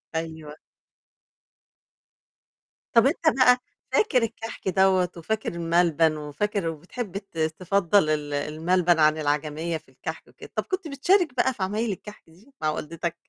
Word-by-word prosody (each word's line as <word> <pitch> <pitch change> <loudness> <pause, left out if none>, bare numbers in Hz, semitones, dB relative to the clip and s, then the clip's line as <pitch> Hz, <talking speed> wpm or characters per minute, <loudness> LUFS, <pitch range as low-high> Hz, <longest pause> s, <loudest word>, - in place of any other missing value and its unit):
أيوه. 160 -2 -5 2.4
طَب 230 +1 +6
أنت 300 - 0 0.2
بقى 250 -1 +6 0.4
فاكر 260 - +3
الكحك 225 -2 -5
دوّة، 190 -1 +3
وفاكر 215 +4 -3
الملبن، 165 -2 +2
وفاكر 165 +5 -2
وبتحب 180 +6 -5
ت 195 -4 -11
تفضل 170 +2 +2
ال 150 -1 -1
الملبن 165 +4 +1
عن 155 0 +4
العجمية 150 +2 -1
في - - -20
الكحك - - -7
وكده، - - -13
طَب - - 0
كنت 375 -4 -3
بتشارك 315 +3 +2
بقى 260 +2 +2
في 195 - -4
عمايل 210 +3 -1
الكحك 210 +2 -9
دي 210 +12 -21
مع 155 - +1
والدتك؟ 165 +2 -4
175 Hz, 135 wpm, -25 LUFS, 155-220 Hz, 2.4 s, طَب